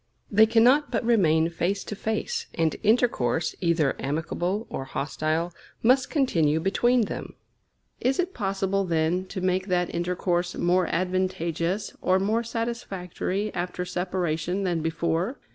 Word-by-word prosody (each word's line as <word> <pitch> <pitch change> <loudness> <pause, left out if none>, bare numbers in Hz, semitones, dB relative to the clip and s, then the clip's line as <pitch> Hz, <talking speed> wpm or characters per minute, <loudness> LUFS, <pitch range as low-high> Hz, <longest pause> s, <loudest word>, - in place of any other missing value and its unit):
They 220 +2 +6
cannot 245 +6 +4
but - - -1
remain 165 -8 +3
face 185 +4 -1
to 210 - -6
face; 340 - -2
and 165 -1 +1
intercourse, 205 - +2
either 165 -5 +2
amicable 170 +8 -2
or 135 - -4
hostile, 155 +5 -2 0.3
must 255 +3 +4
continue 165 - +2
between 240 +8 +2
them. 215 - -4 0.6
Is 260 +2 +1
it 360 +1 -1
possible, 195 -2 0
then, 170 +1 0
to 185 - -5
make 185 +1 0
that 180 -2 0
intercourse 175 0 -1
more 180 0 +2
advantageous 185 0 -1
or 185 0 +3
more 210 +4 +1
satisfactory 215 -4 -3
after 180 0 -3
separation 180 0 -2
than 175 -3 0
before? 165 - -1
185 Hz, 130 wpm, -26 LUFS, 170-215 Hz, 0.6 s, They